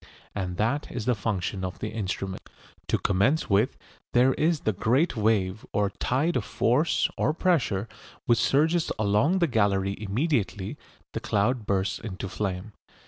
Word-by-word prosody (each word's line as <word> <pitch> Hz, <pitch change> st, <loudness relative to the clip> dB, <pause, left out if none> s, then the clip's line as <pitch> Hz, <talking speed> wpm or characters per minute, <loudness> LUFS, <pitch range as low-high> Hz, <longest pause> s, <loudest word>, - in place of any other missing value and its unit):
And 90 Hz, -3 st, -3 dB
that 125 Hz, +8 st, 0 dB
is 115 Hz, -4 st, -4 dB
the 125 Hz, -, +3 dB
function 100 Hz, -3 st, -2 dB
of 90 Hz, -1 st, -4 dB
the 110 Hz, -, -4 dB
instruments. 95 Hz, -3 st, -4 dB, 0.4 s
To -, -, +2 dB
commence 100 Hz, +9 st, +1 dB
with, 100 Hz, -, +2 dB, 0.4 s
there 125 Hz, +2 st, +5 dB
is 160 Hz, +1 st, +1 dB
the 110 Hz, -, 0 dB
great 130 Hz, -, +2 dB
wave 105 Hz, -2 st, +1 dB
or 105 Hz, -1 st, +1 dB
tide 140 Hz, -, 0 dB
of 125 Hz, -, +1 dB
force 125 Hz, +9 st, +2 dB
or 155 Hz, -, +1 dB
pressure 130 Hz, -, +1 dB, 0.4 s
which 120 Hz, -4 st, +3 dB
surges 160 Hz, +4 st, +2 dB
along 110 Hz, -, +2 dB
the 175 Hz, -2 st, +3 dB
gallery 100 Hz, -5 st, +1 dB
immediately 105 Hz, -, -1 dB, 0.4 s
the -, -, -3 dB
cloud 105 Hz, +2 st, 0 dB
bursts 100 Hz, 0 st, 0 dB
into 95 Hz, -2 st, -5 dB
flame. 95 Hz, +1 st, -4 dB
110 Hz, 150 wpm, -27 LUFS, 100-135 Hz, 0.4 s, there